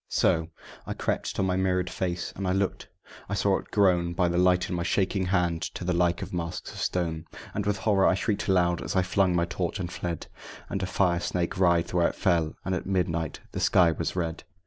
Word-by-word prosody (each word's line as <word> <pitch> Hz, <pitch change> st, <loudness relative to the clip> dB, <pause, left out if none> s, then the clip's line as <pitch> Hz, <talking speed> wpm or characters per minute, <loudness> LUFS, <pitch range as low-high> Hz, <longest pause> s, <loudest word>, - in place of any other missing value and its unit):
So 80 Hz, 0 st, +2 dB, 0.4 s
I -, -, -3 dB
crept -, -, -2 dB
to -, -, 0 dB
my 95 Hz, -1 st, +1 dB
mirrored 90 Hz, -1 st, +1 dB
face, 90 Hz, -1 st, -3 dB
and 95 Hz, -1 st, -3 dB
I 90 Hz, -, +2 dB
looked, 95 Hz, 0 st, -1 dB, 0.2 s
and -, -, -17 dB
I -, -, -2 dB
saw 95 Hz, 0 st, +2 dB
it -, -, -13 dB
grown 90 Hz, -4 st, +3 dB
(By 85 Hz, 0 st, +2 dB
the 85 Hz, -, 0 dB
light 90 Hz, 0 st, +3 dB
in -, -, -3 dB
my 85 Hz, -, -1 dB
shaking 95 Hz, +1 st, 0 dB
hand) 90 Hz, -3 st, +1 dB
to -, -, -5 dB
the 90 Hz, 0 st, 0 dB
like 90 Hz, +3 st, +1 dB
of -, -, -7 dB
the 90 Hz, -, -2 dB
masks 85 Hz, +2 st, -4 dB
of -, -, -8 dB
stone; 85 Hz, -3 st, -1 dB, 0.3 s
And 105 Hz, 0 st, -2 dB
with 105 Hz, -1 st, +1 dB
horror 95 Hz, -1 st, +3 dB
I 95 Hz, -, +4 dB
shrieked 100 Hz, +1 st, -1 dB
aloud 90 Hz, -3 st, +2 dB
as -, -, -4 dB
I 95 Hz, -, +4 dB
flung 90 Hz, 0 st, +2 dB
my 85 Hz, 0 st, +2 dB
torch 90 Hz, +2 st, -3 dB
and 90 Hz, -1 st, -4 dB
fled, 85 Hz, -2 st, -4 dB, 0.5 s
And 100 Hz, -, -1 dB
a 95 Hz, -, -1 dB
fire 90 Hz, -1 st, +2 dB
snake 85 Hz, +1 st, -2 dB
writhed 85 Hz, -2 st, +3 dB
where 85 Hz, -1 st, +4 dB
it -, -, -4 dB
fell; 85 Hz, -4 st, +1 dB
and 95 Hz, -, -1 dB
at 90 Hz, -, -3 dB
midnight 85 Hz, -4 st, -1 dB
the -, -, -4 dB
sky 90 Hz, -4 st, +4 dB
was 80 Hz, +2 st, -3 dB
red. 85 Hz, -3 st, -2 dB
90 Hz, 235 wpm, -27 LUFS, 85-95 Hz, 0.5 s, I